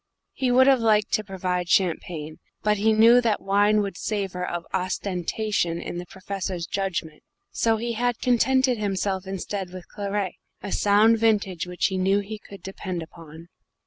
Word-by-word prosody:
He 260 -2 -1
would 255 +1 +6
have 270 -1 +5
liked 215 -2 +2
to 215 - +1
provide 180 -3 -3
champagne, 165 -4 0 0.2
but 210 0 +2
he 220 +2 +3
knew 230 +3 +6
that 225 -3 +1
wine 205 +2 +3
would 195 -2 -5
savour 195 -4 -3
of 175 -1 -4
ostentation 185 0 -1
in 175 - -5
the 175 - -8
Professor's 190 -2 -5
judgment, 190 -6 -3 0.3
so 225 -1 +1
he 235 +1 -3
had 240 +1 0
contented 255 0 +2
himself 195 -2 -2
instead 195 0 -4
with 185 -1 -10
claret, 200 -2 -3 0.3
a 200 - -5
sound 215 +2 +4
vintage 205 -6 +1
which 180 0 -1
he 190 -2 0
knew 195 +2 +3
he 210 +2 -7
could 200 -3 -13
depend 185 -3 -5
upon. 165 0 -13
200 Hz, 165 wpm, -25 LUFS, 180-215 Hz, 0.3 s, would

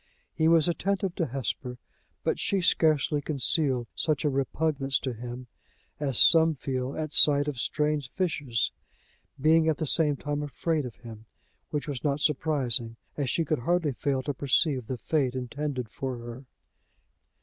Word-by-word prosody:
He 160 - +2
was 165 -1 +5
attentive 190 +1 -1
to 170 - -1
Hesper; 125 -1 -4 0.5
but - - 0
she 200 - +1
scarcely 155 -3 +2
concealed 135 -3 +1
such 155 -2 0
a 145 - +2
repugnance 135 0 0
to 130 -2 -3
him 120 +2 -7 0.5
as 135 -5 -1
some 160 -1 +6
feel 130 0 -3
at 155 -1 -3
sight 145 -1 +5
of 140 -4 -3
strange 150 +1 0
fishes 145 - -1 0.7
being 160 +3 +4
at 160 - +2
the 160 - -2
same 150 0 +2
time 145 +1 -3
afraid 150 0 -2
of 120 - -11
him, 110 -2 -12 0.4
which 150 -1 -3
was 140 -4 -4
not 145 -1 0
surprising, 130 -7 +1 0.2
as 140 -3 -2
she 165 - 0
could 155 -1 0
hardly 165 +2 +1
fail 135 +1 -1
to 145 - -2
perceive 135 -2 +1
the 130 - -3
fate 130 -1 0
intended 130 0 -3
for 130 +2 -5
her. 120 +3 -9
145 Hz, 160 wpm, -27 LUFS, 130-155 Hz, 0.7 s, some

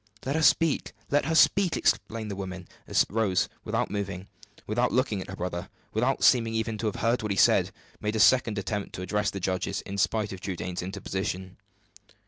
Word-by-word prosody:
"Let 135 +3 -1
her 160 - +1
speak! 165 -1 +3 0.2
let 145 -1 +3
her 160 +2 0
speak!" 190 +1 +4
exclaimed 110 -1 0
the - - -4
women, 95 -2 -6 0.2
as - - +3
Rose, 100 -3 +1 0.2
without - - -1
moving, 100 -2 -4 0.4
without 120 +4 +1
looking 125 -6 +1
at - - -9
her 95 - -5
brother, 90 0 -4 0.2
without 125 +5 +1
seeming 115 -3 +4
even 110 -1 -2
to 115 - -1
have 105 - -2
heard 115 +2 +2
what 105 - -3
he 100 - -1
said, - - +5 0.3
made 105 +1 -2
a - - 0
second 115 -2 +4
attempt 100 +1 -3
to 90 - -5
address 105 +1 0
her 100 - -5
judges, 95 +1 -2
in 100 0 -6
spite 105 0 0
of 95 - -9
Trudaine's 90 -2 -4
interposition. 95 0 -4
105 Hz, 195 wpm, -27 LUFS, 95-115 Hz, 0.4 s, said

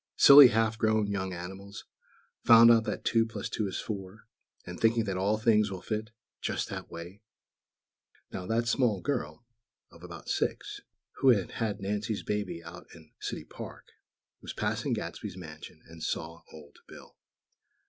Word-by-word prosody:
"Silly 140 -1 +10
half 110 -1 0
grown 110 -2 +2
young 100 -2 -3
animals, 95 +3 -8 0.6
found 115 0 +8
out 115 -1 +4
that - - -4
two 115 -1 +3
plus 110 -3 -6
two 105 - -2
is 95 - -4
four, 100 +1 -7 0.4
and 90 0 -8
thinking 115 0 +3
that 100 -3 -3
all 100 +3 +1
things 110 -2 +3
will 95 -2 -7
fit, 110 0 -3 0.3
just - - -2
that - - -7
way!" 85 +4 -10 1.1
Now 90 - -6
that 115 +2 0
small 115 -5 +1
girl, 125 -3 -3 0.5
"of 85 - -17
about 85 -2 -10
six," - - -2 0.4
who 135 - +4
had 100 -7 +3
had 110 -3 -3
Nancy's 105 +2 -3
baby 105 -5 -3
out 85 +1 -11
in 80 -2 -17
City - - -5
Park, - - -10 0.5
was - - -7
passing - - -2
Gadsby's 90 - -5
mansion, 80 -2 -11
and 80 0 -13
saw 80 +1 -4
Old 75 -2 -14
Bill. - - -14
105 Hz, 160 wpm, -29 LUFS, 90-115 Hz, 1.1 s, Silly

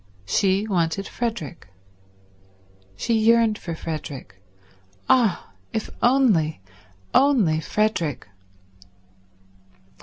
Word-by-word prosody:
She 195 - +1
wanted 180 0 0
Frederick. 195 - -5 1.3
She 230 - -1
yearned 225 -1 +3
for 170 -2 -5
Frederick. 145 - -7 0.7
Ah, 225 - +2 0.2
if 220 - -3
only, 225 - +3 0.5
only 235 - +4
Frederick 170 - -1
195 Hz, 70 wpm, -23 LUFS, 160-230 Hz, 1.3 s, only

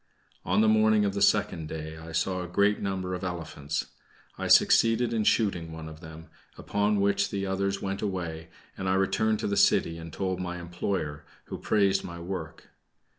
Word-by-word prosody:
On - - +2
the 110 - +4
morning 110 -1 +4
of 100 - 0
the 100 - -3
second 80 -1 +2
day, 80 0 -6
I 80 +1 -10
saw 90 +3 -1
a 90 - -5
great 100 +4 +2
number 95 -2 -3
of 90 +1 -4
elephants. 80 -5 -4 0.5
I - - -4
succeeded 115 +1 +5
in 110 -2 +1
shooting 90 -9 +1
one 80 0 -7
of 80 0 -10
them, 80 -1 -10 0.3
upon 105 0 0
which 100 0 +2
the 100 -1 -3
others 100 +1 -1
went 95 0 -3
away, 85 -5 -4 0.3
and 95 -1 -3
I 95 - +2
returned 100 +3 +1
to - - -1
the 100 - 0
city 85 -3 +3
and 80 0 -8
told 95 +2 -2
my 90 -1 -4
employer, 85 -3 -3 0.2
who - - -7
praised 100 -2 +2
my 85 -1 -7
work. 85 -2 -7
95 Hz, 185 wpm, -28 LUFS, 80-100 Hz, 0.5 s, succeeded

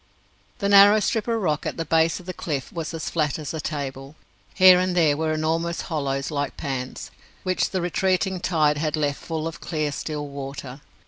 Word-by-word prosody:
The 200 - -1
narrow 200 +1 +8
strip 215 +2 -1
of 230 -1 0
rock 155 -7 -1
at - - -4
the 165 - -2
base 160 +1 +2
of 180 - -14
the 185 - -5
cliff 145 -9 -4
was 165 -3 -4
as 165 -1 -5
flat 150 -4 0
as 155 -2 -5
a 160 - -3
table. 140 -1 -5 0.4
Here 185 -2 +8
and 185 0 0
there 155 -4 +4
were 160 +1 -1
enormous 165 +2 -1
hollows 140 -3 -2
like 145 -2 -3
pans, 130 -2 -5 0.3
which 185 -1 0
the 185 - -2
retreating 185 +2 0
tide 155 -5 +2
had 155 0 0
left 145 -2 -1
full 160 -1 -4
of 165 - -8
clear, 155 -3 -2
still 145 0 -4
water. 140 -1 -7
160 Hz, 195 wpm, -24 LUFS, 145-180 Hz, 0.4 s, narrow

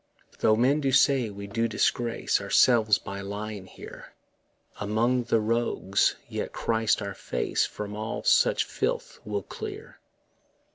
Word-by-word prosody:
Though 110 - +4
men 135 +6 +2
do 135 -2 +1
say 130 -3 +4
we 100 0 -8
do 115 +3 -1
disgrace 115 +1 0
Ourselves 110 -4 +4
by 100 0 -7
lying 100 0 -6
here - - -12 0.7
Among 115 +4 +1
the 115 - +2
rogues, 110 -3 +1
yet - - -5
Christ 110 -2 0
our 100 0 -4
face 60 - -1
From 105 0 -7
all 110 +1 -4
such - - +4
filth - - -3
will 105 -2 -3
clear. - - -8
110 Hz, 135 wpm, -27 LUFS, 100-115 Hz, 0.7 s, Though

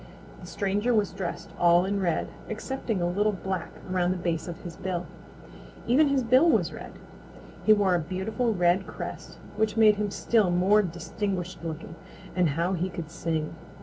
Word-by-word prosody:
The - - -10
stranger 205 +4 0
was 205 -4 +2
dressed 185 -2 -5
all 175 +1 +5
in 200 +1 -1
red, 175 -4 0 0.2
excepting 220 -3 -3
a - - +2
little 205 +4 +1
black 190 -2 -3 0.2
around 180 -1 +1
the 185 - 0
base 170 -2 -2
of 170 -2 -6
his 170 -2 -8
bill. 185 -2 -3 0.8
Even 280 +6 +4
his 275 -2 +2
bill 255 +8 +5
was - - +2
red. - - -9 0.7
He 215 - +9
wore 200 -3 +3
a 175 - +3
beautiful 195 +8 -1
red 180 -1 +2
crest - - -7 0.2
which 220 0 0
made 215 -2 +6
him 210 0 -1
still 210 -1 +2
more 185 +4 +4
distinguished 180 0 -4
looking, 165 0 -6 0.4
and 180 -3 +3
how 170 +6 0
he 180 +1 -1
could 165 -3 -7
sing! 160 -2 -2
190 Hz, 175 wpm, -27 LUFS, 175-210 Hz, 0.8 s, He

